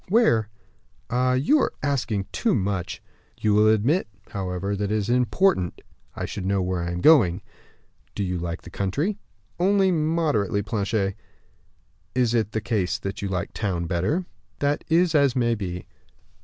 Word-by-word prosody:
"Where?" 150 - +3 0.6
"Ah, 125 +1 +2
you 145 - +3
are - - 0
asking 120 -8 0
too 230 - +1
much." 95 -3 -2 0.4
"You 105 -1 +2
will 105 +1 +5
admit, 110 - +2 0.2
however, 95 +1 -3
that 100 +1 -2
it - - +2
is 105 +2 -1
important 125 - +1 0.3
I - - -3
should 100 - -5
know 100 +1 +1
where 90 -1 -1
I 85 - -2
am 85 0 -3
going." 100 - +5 0.7
"Do 100 - -1
you 90 -2 -2
like 85 +1 -4
the 90 - -11
country?" 145 - -1 0.4
"Only 190 +1 +3
moderately, 155 - +1
Planchet." 100 -1 -1 1.0
"In 130 - +3
that 110 -2 0
case 105 -3 0 0.2
you 100 - -3
like 95 0 -3
town 90 -5 -2
better?" 95 - 0 0.3
"That 145 +1 0
is 170 +1 +3
as 140 -4 +3
may 120 -2 +2
be." 90 -5 -4
110 Hz, 155 wpm, -24 LUFS, 95-145 Hz, 1.0 s, will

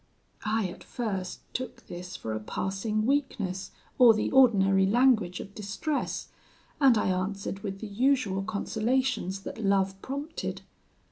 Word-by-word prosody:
"I, 220 0 +1
at 175 - -10
first, 195 -6 -4
took 255 0 -5
this 180 +1 -7
for 110 - -4
a 110 - -2
passing 195 - -2
weakness, 225 -9 -1 0.3
or 240 -3 +8
the 215 - -1
ordinary 195 -7 +5
language 220 -5 +3
of 200 - -8
distress; 215 +9 -3 0.5
and 265 -5 +6
I 210 - +1
answered 195 +1 -2
with 195 -1 -5
the 220 - -4
usual 220 -2 +1
consolations 220 0 -1
that 225 - -6
love 195 -1 +1
prompted. 285 +4 -5
205 Hz, 135 wpm, -28 LUFS, 190-250 Hz, 0.5 s, or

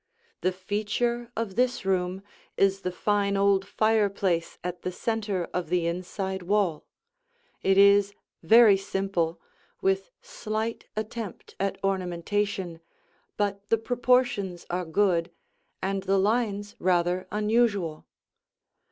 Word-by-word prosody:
The 185 - +2
feature 215 +5 -2
of 220 -4 -3
this 250 -4 +1
room 185 0 0 0.3
is 195 0 +3
the 185 - -2
fine 200 +1 +1
old 195 -1 +3
fireplace 200 -6 +1
at 180 0 -4
the 185 - -3
center 205 -2 -2
of 180 -3 -2
the 175 -1 +1
inside 185 +2 -3
wall. 180 -4 0 0.7
It 195 0 +3
is 200 0 +5 0.3
very 225 -3 +7
simple, 195 -4 -2 0.4
with 385 +3 0
slight 230 - -4
attempt 215 -2 -6
at 195 0 -1
ornamentation, 190 -1 -1 0.6
but 200 -1 -2
the 225 - +4
proportions 240 -6 +1
are 180 0 -1
good, 170 0 +1 0.5
and 195 0 -1
the 195 +1 +1
lines 205 0 0
rather 180 0 +1
unusual. 210 -6 +1
195 Hz, 115 wpm, -27 LUFS, 185-215 Hz, 0.7 s, very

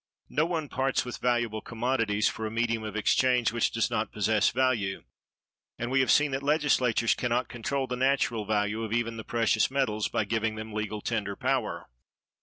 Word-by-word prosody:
No 155 +2 +1
one 165 -3 -2
parts 135 -1 0
with 125 - -6
valuable 120 -3 0
commodities 115 -3 0
for 110 - -3
a - - -4
medium 115 0 0
of 110 -1 -6
exchange 125 +2 +2
which 115 0 +1
does 115 +1 -1
not 110 -1 -1
possess 105 0 +2
value; 120 -6 0 0.7
and 120 +1 -3
we 135 - +3
have 130 - +2
seen 150 -1 +4
that 135 +1 -2
Legislatures 140 -6 +2
can 125 - -2
not 125 +2 0
control 135 +3 -2
the 125 -1 -3
natural 130 -3 +1
value 105 +1 0
of 110 -1 -3
even 115 -1 -1
the 110 - -6
precious 115 -1 +1
metals 120 -6 0
by 110 - -1
giving 110 +1 -1
them 110 0 -7
legal 105 0 -3
tender 100 -3 -2
power. - - -1
115 Hz, 190 wpm, -28 LUFS, 110-130 Hz, 0.7 s, seen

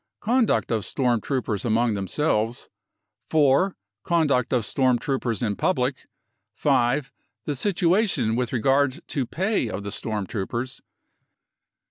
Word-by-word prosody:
Conduct 235 - +2
of 110 -3 0
storm 120 -3 0
troopers 120 -7 -2
among 115 0 +2
themselves. 110 - -1 0.3
" 110 +2 -49
4. 155 +5 +3 0.3
Conduct 145 -8 +1
of 120 -4 +1
storm 130 0 +2
troopers 125 -3 -2
in 105 -3 0
public. 130 - -1 0.2
" - - -54
5. 135 0 +1 0.3
The 145 - -2
situation 180 - +1
with 125 -1 -1
regard 135 +5 +1
to 135 -6 -1
pay 190 - 0
of 100 -1 -5
the 100 - -5
storm 105 -1 -3
troopers. 120 +6 -4
125 Hz, 130 wpm, -24 LUFS, 115-150 Hz, 0.3 s, 4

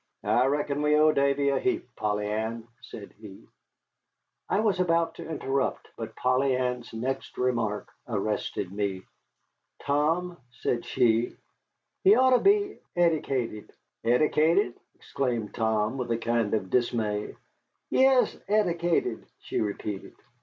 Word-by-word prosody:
"I 125 +2 +3
reckon 145 +1 0
we 150 0 +3
owe 155 +1 +5
Davy 140 0 +2
a 140 - +1
heap, 360 -2 -2
Polly 105 -1 -1
Ann," 110 +2 -3
said 100 - -10
he. 100 -3 -12 1.0
I - - +2
was 205 -4 +1
about 170 -2 +2
to - - -8
interrupt, 140 -3 -2
but - - -7
Polly 130 +1 +2
Ann's 125 -1 -2
next 130 +4 -4
remark 115 -5 -1 0.2
arrested 105 -3 -2
me. 100 -2 -2 0.8
"Tom," 165 +5 0 0.2
said 120 0 -2
she, 115 0 +2 0.7
"he 395 +2 +7
oughter 260 -1 +5
be 405 0 +2 0.2
eddicated." 135 -10 0 0.3
"Eddicated!" 155 - +3 0.2
exclaimed 120 -6 -3
Tom, 110 +2 0
with 125 - -3
a 115 - +1
kind 115 -2 0
of 95 -4 -3
dismay. 110 -4 0 0.6
"Yes, 265 -1 +4
eddicated," 175 - +1
she - - -2
repeated. 105 -1 -4
125 Hz, 125 wpm, -27 LUFS, 110-160 Hz, 1.0 s, he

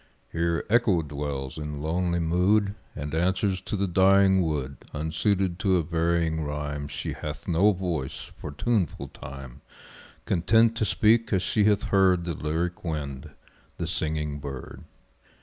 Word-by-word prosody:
Here 85 0 0
Echo 105 -7 +3
dwells 70 -1 -4
in 75 -1 -5
lonely 85 +3 0
mood, 95 +5 +2 0.2
And 75 +1 -5
answers 95 +3 +1
to 100 - -4
the 100 0 0
dying 95 +1 +5
wood; 70 -5 -2 0.2
Unsuited 85 +4 0
to 95 -2 +3
a 85 - +1
varying 80 -1 0
rhyme 75 0 -4
She 70 0 -4
hath - - -7
no 95 +6 +4
voice 85 -8 -4
for - - -6
tuneful 100 +2 -1
Time 65 0 -10 0.6
Content 110 +6 +3
to 110 - +1
speak 110 +2 +3
as 95 -2 +2
she 105 +2 +2
hath 105 -1 +3
heard 95 -3 +3
The 85 - -2
lyric 80 +4 -2
wind, 75 -3 -4 0.5
the - - -2
singing 75 -2 -2
bird. 70 -2 -8
85 Hz, 145 wpm, -26 LUFS, 75-95 Hz, 0.6 s, dying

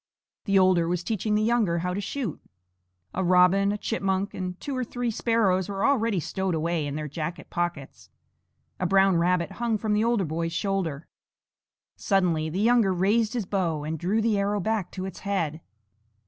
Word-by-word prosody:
The 195 -1 +3
older 185 -3 +4
was 175 0 -1
teaching 215 0 -1
the 210 - +2
younger 220 -7 +2
how 180 +2 -2
to 200 - -2
shoot. 225 - -4 0.7
A 190 - -1
robin, 185 +2 +4
a 210 - -2
chipmunk, 195 -2 -1
and 180 -1 -5
two 280 - -4
or 255 - -1
three 245 0 -3
sparrows 205 -5 +1
were 195 0 -1
already 230 -8 +2
stowed 190 +2 -2
away 160 -1 -1
in 145 - -4
their 155 0 -3
jacket 155 +3 -6
pockets; 175 -6 -4 0.7
a 180 - 0
brown 195 -1 +4
rabbit 175 +1 +1
hung 230 -2 +1
from 215 0 -1
the 210 +1 +2
older 230 -4 +1
boy's 165 +1 -3
shoulder. 170 -6 -2 0.9
Suddenly 175 -6 +1
the 175 +5 -3
younger 230 -3 +4
raised 205 +5 +1
his 235 -5 -2
bow 175 -6 -1
and 160 +1 -4
drew 200 +7 +1
the 220 -3 +2
arrow 205 +1 0
back 210 -1 -1
to 185 -1 -4
its 190 - -7
head. 165 -6 -2
190 Hz, 180 wpm, -26 LUFS, 170-210 Hz, 0.9 s, older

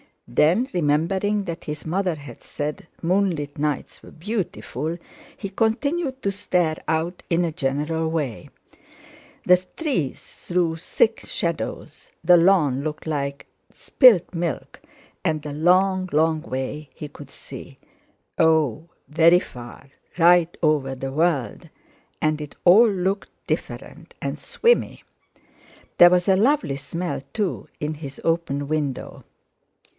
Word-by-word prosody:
Then, 190 - +2
remembering 180 +6 +1
that 170 -3 -6
his 150 0 -6
mother 180 +1 0
had 140 -5 -11
said 150 +2 -5 0.2
moonlit 170 -5 0
nights 150 -2 -2
were - - -13
beautiful, 170 - -4 0.4
he 200 - -5
continued 265 - -1
to 200 - +1
stare 175 -5 0
out 165 +3 -1
in 170 +1 +2
a 165 - -2
general 150 +3 -1
way. 150 -8 -3 1.0
The 180 - +7 0.2
trees 260 - -1 0.3
threw 175 -2 +1
thick 450 - +1
shadows, - - -4
the 180 -1 +7
lawn 165 -7 +3
looked 150 +1 -5
like 140 -3 -3 0.3
spilt 225 - +4
milk, 170 -3 -4 0.4
and 155 -2 -1
a 150 - -4
long, 185 +4 +2
long 160 +1 +2
way 140 0 -5
he 150 - -7
could 145 -1 -12
see; - - -11 0.6
oh! 160 -2 +2 0.2
very 165 +3 +5
far; 120 -2 -11 0.3
right 175 0 +5
over 145 -4 +2
the 135 +1 -5
world, 145 -6 -1 0.5
and 155 0 +1
it 150 - -8
all 215 +6 +7
looked 195 0 -1 0.2
different - - -5
and - - -3
swimmy. 475 +1 +1 1.0
There 175 - +10
was 180 +1 +2
a 190 -1 +4
lovely 210 - +2
smell, 165 +4 -4
too, 205 -5 -2
in 150 +1 -3
his 140 -2 -9
open 165 -4 -1
window. 150 -4 -3
165 Hz, 125 wpm, -23 LUFS, 150-185 Hz, 1.0 s, There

